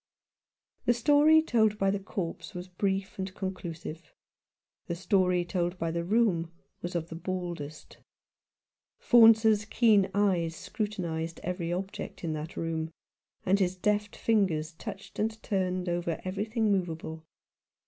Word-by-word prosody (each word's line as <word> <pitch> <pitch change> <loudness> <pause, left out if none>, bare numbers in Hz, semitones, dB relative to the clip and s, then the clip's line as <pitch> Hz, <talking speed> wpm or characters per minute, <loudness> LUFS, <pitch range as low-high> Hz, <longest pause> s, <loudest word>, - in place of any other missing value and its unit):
The 240 - +4
story 295 +5 +5
told 220 -7 +2
by 195 -1 +2
the 200 - -1
corpse 195 -1 -5
was 180 +1 -6
brief 195 +1 -2
and 190 0 -3
con 190 -1 -2
clusive. 165 -2 -7 0.9
The 170 - -2
story 180 -1 +2
told 175 0 -1
by 165 -2 -1
the 170 +1 -2
room 180 -4 +2 0.3
was 175 +1 -5
of 170 -1 -2
the 165 - -6
baldest. 170 -4 -5 1.0
Faunce's 225 -3 +6
keen 215 -3 +4
eyes 180 -5 +2
scrutinized 170 -7 -3
every 175 -2 -2
object 190 +1 -5
in 160 -2 -1
that 155 +3 -6
room, 160 -1 -2 0.6
and 195 +2 +3
his 185 -1 +1
deft 210 +2 0
fingers 180 -8 +1
touched 195 +4 -8
and 220 +1 -1
turned 185 -3 -1
over 175 -1 -1
everything 215 +3 0
movable. 160 -4 -2
185 Hz, 135 wpm, -29 LUFS, 170-210 Hz, 1.0 s, Faunce's